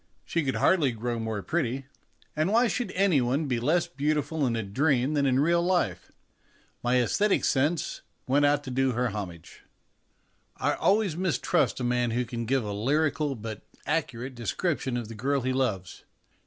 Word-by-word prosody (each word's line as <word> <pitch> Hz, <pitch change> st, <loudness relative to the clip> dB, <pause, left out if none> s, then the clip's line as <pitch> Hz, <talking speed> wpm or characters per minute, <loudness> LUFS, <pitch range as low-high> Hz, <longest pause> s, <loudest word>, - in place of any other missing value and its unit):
She 165 Hz, -, -1 dB
could 135 Hz, -2 st, -1 dB
hardly 155 Hz, -9 st, +3 dB
grow 120 Hz, +1 st, -3 dB
more 110 Hz, -3 st, -3 dB
pretty; 130 Hz, +8 st, -1 dB, 0.5 s
and 155 Hz, +5 st, +1 dB
why 235 Hz, +3 st, +4 dB
should 245 Hz, +1 st, -2 dB
any 185 Hz, -7 st, +3 dB
one 130 Hz, +6 st, 0 dB
be 125 Hz, -4 st, -1 dB
less 155 Hz, +8 st, +2 dB
beautiful 150 Hz, +1 st, -1 dB
in 115 Hz, -, 0 dB
a 115 Hz, -, -2 dB
dream 130 Hz, +6 st, +1 dB
than 140 Hz, -2 st, +2 dB
in 130 Hz, 0 st, +3 dB
real 170 Hz, +4 st, +3 dB
life? 180 Hz, 0 st, 0 dB, 0.7 s
My 125 Hz, +1 st, +2 dB
aesthetic 200 Hz, -, +2 dB
sense 145 Hz, +4 st, 0 dB, 0.2 s
went 140 Hz, +3 st, +2 dB
out 145 Hz, 0 st, +3 dB
to 130 Hz, -, -6 dB
do 130 Hz, 0 st, +1 dB
her 125 Hz, +1 st, 0 dB
homage. 95 Hz, -6 st, -7 dB, 1.0 s
I -, -, +1 dB
always 200 Hz, -4 st, +2 dB
mistrust 180 Hz, -6 st, +1 dB
a -, -, -3 dB
man 120 Hz, 0 st, +1 dB
who 120 Hz, +2 st, 0 dB
can 115 Hz, -1 st, -4 dB
give 135 Hz, 0 st, +1 dB
a 105 Hz, -1 st, -4 dB
lyrical, 145 Hz, +5 st, 0 dB
but 110 Hz, -2 st, -7 dB, 0.2 s
accurate, 135 Hz, -5 st, -2 dB
description 125 Hz, -, -2 dB
of 120 Hz, -3 st, -4 dB
the 115 Hz, -, -8 dB
girl 135 Hz, +6 st, 0 dB
he 130 Hz, +1 st, -1 dB
loves. 110 Hz, -9 st, -2 dB
135 Hz, 175 wpm, -27 LUFS, 120-155 Hz, 1.0 s, why